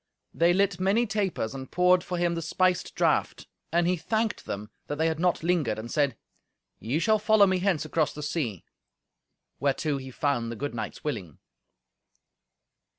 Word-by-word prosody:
They 170 +1 +4
lit 195 0 +2
many 200 +6 +2
tapers, 200 - -1
and 130 -1 -7
poured 180 0 +4
for 180 -1 -4
him 175 0 +1
the 165 - -3
spiced 180 +2 0
draught. - - +1 0.3
And 170 +1 +2
he 180 +1 +2
thanked 215 +7 -1
them 105 +1 -5 0.2
that 145 - -3
they 160 - +1
had 160 -1 0
not 180 -2 +1
lingered, 165 -10 +1
and 115 +2 -7
said, 145 -3 +1 0.6
"Ye 120 +7 -1
shall 215 +5 +3
follow 210 -1 +5
me 185 -1 +1
hence 180 -5 +1
across 155 -1 +1
the 150 - -7
sea;" 145 - -3 0.9
whereto 140 +1 0
he 130 -1 -7
found 120 -3 -1
the - - -5
good 145 +4 -4
knights 110 -2 -6
willing. 105 - -4
165 Hz, 170 wpm, -27 LUFS, 140-185 Hz, 0.9 s, follow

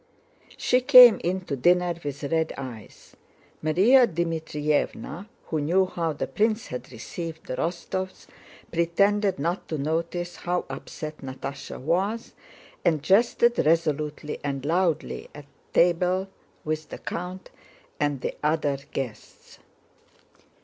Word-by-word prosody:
She 250 - +2
came 250 -3 +9
in 185 +2 0
to 155 -6 -4
dinner 175 +5 +3
with 145 0 -5
red 160 +2 0
eyes. 125 -6 -10 0.5
Márya 215 +12 +5
Dmítrievna, 160 +1 -2 0.2
who 155 -2 0
knew 180 +6 +3
how 170 -3 -2
the 145 - -3
prince 220 +1 0
had 125 0 -7
received 160 +7 -7
the - - -4
Rostóvs, 185 +2 -3 0.5
pretended 200 +4 +2
not 170 +6 -2
to 155 - -3
notice 165 +4 -2
how 180 0 -2
upset 155 -1 -7
Natásha 135 +1 -7
was 190 - -1 0.5
and 155 -4 +2
jested 235 +6 +3
resolutely 150 -1 0
and 140 -1 -3
loudly 170 0 0
at 145 -1 -10 0.3
table 180 +2 +2 0.3
with 155 0 -3
the - - -7
count 180 +2 -6 0.5
and 145 -3 0
the - - -3
other 150 -2 +1
guests. 125 -5 -7
165 Hz, 120 wpm, -26 LUFS, 150-185 Hz, 0.5 s, came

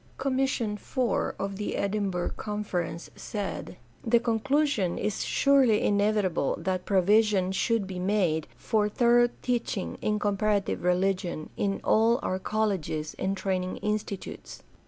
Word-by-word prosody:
Commission 260 -5 0
IV - - -18 0.4
of 195 0 -4
the 210 - -3
Edinburgh 200 -3 -1
Conference 185 -6 -4
said: 200 -3 -5 0.3
The 235 +1 +4
conclusion 230 - +1
is 210 -2 -1
surely 270 -6 +3
inevitable 205 -6 +1
that 185 -1 -2
provision 200 0 +3
should 220 +2 +1
be 190 -1 -6
made 180 -5 +1
for 210 - 0
thorough 240 +2 +4
teaching 240 -6 -2
in 210 0 +1
comparative 205 -1 0
religion 180 -2 0
in 195 -1 -1
all 230 +3 +4
our 185 - -1
colleges 185 -8 -1
and 195 +1 -1
training 185 -1 -2
institutes. 210 -2 -4
205 Hz, 120 wpm, -28 LUFS, 185-220 Hz, 0.4 s, The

